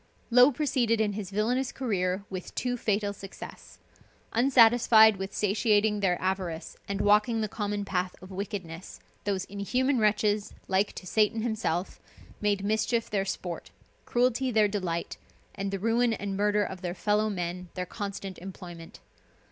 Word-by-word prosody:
Low 250 Hz, +3 st, +7 dB
proceeded 245 Hz, -5 st, +1 dB
in 210 Hz, -2 st, +1 dB
his 200 Hz, -2 st, -5 dB
villainous 240 Hz, +6 st, 0 dB
career 190 Hz, -6 st, -1 dB
with 185 Hz, -2 st, -7 dB
too 250 Hz, -1 st, -1 dB
fatal 205 Hz, -3 st, 0 dB
success. 195 Hz, -1 st, -10 dB, 0.6 s
Unsatisfied 230 Hz, -3 st, +6 dB
with 190 Hz, +1 st, -5 dB
satiating 210 Hz, +1 st, +2 dB
their 185 Hz, -3 st, +1 dB
avarice 185 Hz, -3 st, -3 dB
and 200 Hz, 0 st, -2 dB
walking 210 Hz, +2 st, +3 dB
the 215 Hz, -, 0 dB
common 205 Hz, -1 st, -3 dB
path 180 Hz, -1 st, -2 dB
of 185 Hz, +1 st, -12 dB
wickedness, 190 Hz, -3 st, -6 dB, 0.3 s
those 195 Hz, -2 st, -1 dB
inhuman 250 Hz, +7 st, 0 dB
wretches, 210 Hz, -1 st, +1 dB
like 195 Hz, +2 st, +1 dB
to -, -, -9 dB
Satan 215 Hz, +3 st, +1 dB
himself, 215 Hz, -6 st, -2 dB, 0.4 s
made 205 Hz, -1 st, +1 dB
mischief 220 Hz, +2 st, 0 dB
their 195 Hz, -2 st, 0 dB
sport, 180 Hz, -3 st, -5 dB, 0.4 s
cruelty 250 Hz, +1 st, +1 dB
their 215 Hz, -3 st, +4 dB
delight, 185 Hz, -5 st, -3 dB, 0.4 s
and 195 Hz, 0 st, -3 dB
the 195 Hz, -, -2 dB
ruin 230 Hz, +3 st, +2 dB
and 200 Hz, -2 st, -3 dB
murder 210 Hz, +1 st, +2 dB
of 190 Hz, -2 st, -6 dB
their 175 Hz, -1 st, -3 dB
fellow 210 Hz, +3 st, +1 dB
men 180 Hz, -2 st, -4 dB
their 180 Hz, -1 st, -2 dB
constant 195 Hz, 0 st, -6 dB
employment. 175 Hz, -3 st, -10 dB
205 Hz, 150 wpm, -28 LUFS, 190-220 Hz, 0.6 s, Low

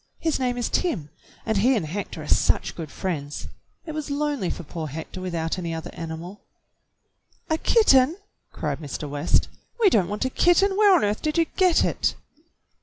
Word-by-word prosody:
His 320 Hz, -4 st, -1 dB
name 250 Hz, -1 st, 0 dB
is 240 Hz, -, -1 dB
Tim, 165 Hz, -, -1 dB, 0.3 s
and 220 Hz, -2 st, 0 dB
he 255 Hz, +6 st, +4 dB
and 205 Hz, -, -1 dB
Hector 165 Hz, -1 st, -5 dB
are -, -, -9 dB
such -, -, +2 dB
good 160 Hz, -3 st, -6 dB
friends. 150 Hz, -4 st, -4 dB, 0.4 s
It 320 Hz, -, -5 dB
was 305 Hz, -1 st, -4 dB
lonely 285 Hz, -8 st, -1 dB
for -, -, -5 dB
poor 160 Hz, 0 st, -5 dB
Hector 160 Hz, +5 st, -7 dB
without 170 Hz, -1 st, -2 dB
any 170 Hz, -2 st, -3 dB
other 160 Hz, -, -6 dB
animal." 165 Hz, +4 st, -7 dB, 1.1 s
"A 315 Hz, -, +2 dB
kitten!" 315 Hz, -, +4 dB, 0.3 s
cried 150 Hz, -3 st, -3 dB
Mr. 150 Hz, -1 st, -5 dB
West. 145 Hz, +3 st, +1 dB, 0.3 s
"We 420 Hz, -5 st, +5 dB
don't 190 Hz, -, +3 dB
want 210 Hz, +5 st, -2 dB
a 260 Hz, -, -1 dB
kitten. 385 Hz, +6 st, +4 dB
Where 410 Hz, -2 st, +6 dB
on 345 Hz, -, +3 dB
earth 205 Hz, +1 st, 0 dB
did 305 Hz, +1 st, -1 dB
you 330 Hz, -, +4 dB
get 365 Hz, -3 st, +4 dB
it. -, -, 0 dB
205 Hz, 180 wpm, -24 LUFS, -, 1.1 s, Where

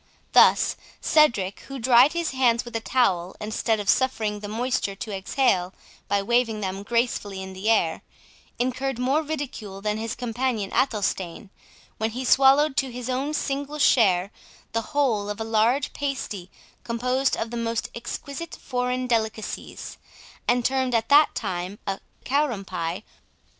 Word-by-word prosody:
Thus -, -, +5 dB, 0.2 s
Cedric, 225 Hz, -11 st, +3 dB
who 275 Hz, -, -6 dB
dried 250 Hz, +3 st, +5 dB
his 340 Hz, -1 st, -1 dB
hands 245 Hz, -3 st, +2 dB
with 240 Hz, -, -9 dB
a -, -, +1 dB
towel, 195 Hz, -8 st, +1 dB
instead 220 Hz, +1 st, -1 dB
of 205 Hz, -, -5 dB
suffering 220 Hz, -5 st, +1 dB
the 205 Hz, -, -6 dB
moisture 225 Hz, -2 st, -1 dB
to 205 Hz, +1 st, -5 dB
exhale 190 Hz, -2 st, +1 dB, 0.3 s
by 200 Hz, -1 st, +1 dB
waving 235 Hz, 0 st, +1 dB
them 195 Hz, -1 st, -3 dB
gracefully 210 Hz, -3 st, -1 dB
in 190 Hz, 0 st, -7 dB
the 190 Hz, +4 st, -2 dB
air, 170 Hz, -8 st, +2 dB, 0.6 s
incurred 255 Hz, +1 st, -1 dB
more 265 Hz, +5 st, +2 dB
ridicule 280 Hz, -10 st, -5 dB
than 210 Hz, +1 st, -2 dB
his 225 Hz, 0 st, -3 dB
companion 240 Hz, -3 st, -2 dB
Athelstane, 195 Hz, -6 st, -1 dB, 0.5 s
when 220 Hz, 0 st, 0 dB
he 250 Hz, +3 st, -5 dB
swallowed 275 Hz, +3 st, +5 dB
to 265 Hz, -2 st, +1 dB
his 250 Hz, +1 st, -4 dB
own 275 Hz, +4 st, -1 dB
single 285 Hz, +1 st, -2 dB
share 200 Hz, -9 st, +4 dB, 0.4 s
the 230 Hz, -, 0 dB, 0.2 s
whole 220 Hz, -8 st, +2 dB
of 210 Hz, +1 st, -4 dB
a -, -, -1 dB
large 225 Hz, +5 st, +1 dB
pasty 265 Hz, -10 st, -4 dB, 0.3 s
composed 250 Hz, +3 st, 0 dB
of 225 Hz, -, -3 dB
the -, -, -4 dB
most 230 Hz, 0 st, -2 dB
exquisite 280 Hz, +7 st, -6 dB
foreign 250 Hz, 0 st, -2 dB
delicacies, 220 Hz, -3 st, -3 dB, 0.5 s
and 245 Hz, -1 st, +2 dB
termed 260 Hz, -2 st, +1 dB
at 225 Hz, 0 st, 0 dB
that 295 Hz, +2 st, +6 dB
time 185 Hz, -1 st, -3 dB
a 195 Hz, -1 st, -2 dB, 0.3 s
"Karum 255 Hz, -7 st, 0 dB
Pie". 175 Hz, +1 st, -4 dB
235 Hz, 150 wpm, -25 LUFS, 205-260 Hz, 0.6 s, that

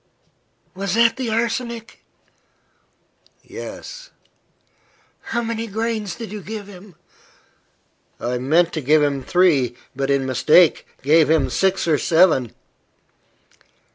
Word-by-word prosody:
"Was 195 Hz, +1 st, -3 dB
that 230 Hz, 0 st, +4 dB
the 255 Hz, -3 st, -4 dB
arsenic?" 230 Hz, 0 st, -3 dB, 1.4 s
"Yes." -, -, -9 dB, 1.2 s
"How 235 Hz, +1 st, -2 dB
many 230 Hz, 0 st, -4 dB
grains 220 Hz, -2 st, -3 dB
did 225 Hz, -4 st, -8 dB
you 210 Hz, -1 st, -6 dB
give 210 Hz, +1 st, -7 dB
him?" 195 Hz, -2 st, -14 dB, 1.2 s
"I 125 Hz, +1 st, -3 dB
meant 165 Hz, +7 st, +2 dB
to 155 Hz, -, -3 dB
give 150 Hz, +3 st, +3 dB
him 140 Hz, -2 st, 0 dB
three, 145 Hz, -8 st, +2 dB, 0.2 s
but, 135 Hz, +1 st, -2 dB
in 140 Hz, -1 st, +1 dB
mistake, 150 Hz, +6 st, +3 dB, 0.2 s
gave 155 Hz, +1 st, +4 dB
him 145 Hz, -5 st, +2 dB
six 190 Hz, +9 st, 0 dB
or 155 Hz, -3 st, +2 dB
seven." 160 Hz, -, +2 dB
180 Hz, 110 wpm, -20 LUFS, 145-225 Hz, 1.4 s, that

